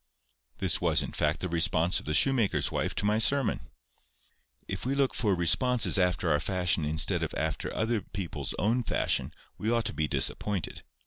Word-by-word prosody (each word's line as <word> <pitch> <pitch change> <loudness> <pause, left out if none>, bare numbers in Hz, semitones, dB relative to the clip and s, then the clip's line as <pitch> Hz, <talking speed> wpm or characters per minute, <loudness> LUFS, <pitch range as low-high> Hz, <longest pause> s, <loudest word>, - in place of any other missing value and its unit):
This - - 0
was - - +2
in - - -6
fact 75 0 -1
the 90 - -2
response 85 0 +1
of - - -13
the 75 - 0
shoemaker's 130 -7 +2
wife - - -2
to 100 - -1
my 105 +1 +2
sermon. 135 +3 +3 1.0
If - - -5
we 135 +2 -1
look 140 -1 +1
for 105 -4 0
responses 110 - +2
after 90 -2 +1
our 75 - +2
fashion 90 -2 +1
instead 80 +1 0
of - - -3
after - - -2 0.4
people's 95 -4 -4
own 115 +6 +1
fashion, 115 - -1 0.3
we 110 - -2
ought 115 -2 +1
to 110 - -2
be 80 -1 -1
disappointed. 100 +5 -1
95 Hz, 175 wpm, -28 LUFS, 85-115 Hz, 1.0 s, sermon